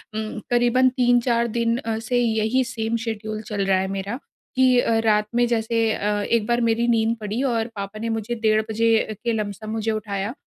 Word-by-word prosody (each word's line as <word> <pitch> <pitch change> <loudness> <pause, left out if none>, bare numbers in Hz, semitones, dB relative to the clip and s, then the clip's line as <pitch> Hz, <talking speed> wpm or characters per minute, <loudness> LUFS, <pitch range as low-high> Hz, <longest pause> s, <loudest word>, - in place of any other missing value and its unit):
उम, 215 0 -4
करीबन 245 +1 +3
3-4 245 -1 +2
दिन 230 +1 0
अ, 225 -4 -3
से 245 +2 0
यही 225 +2 +1
सेम 230 -2 -3
शेड्यूल 215 -1 -4
चल 210 -2 -3
रहा 190 -1 +3
है 190 - -1
मेरा 200 +6 -4 0.4
कि 255 -1 +4
अ, 230 -2 +2
रात 210 -1 +3
में 240 0 +4
जैसे 230 -1 +1
अ, 205 0 -1
एक 225 0 +1
बार 240 0 +1
मेरी 230 +1 +1
नींद 230 0 +2
पड़ी 215 +3 -3
और 235 -3 0
पापा 200 +1 -6
ने 230 +1 -3
मुझे 225 +1 -2
डेढ़ 220 -1 +2
बजे 230 +1 +1 0.3
के 235 -1 0
लमसम 215 0 -4
मुझे 220 0 -1
उठाया। 210 0 -3
225 Hz, 195 wpm, -23 LUFS, 215-235 Hz, 0.4 s, कि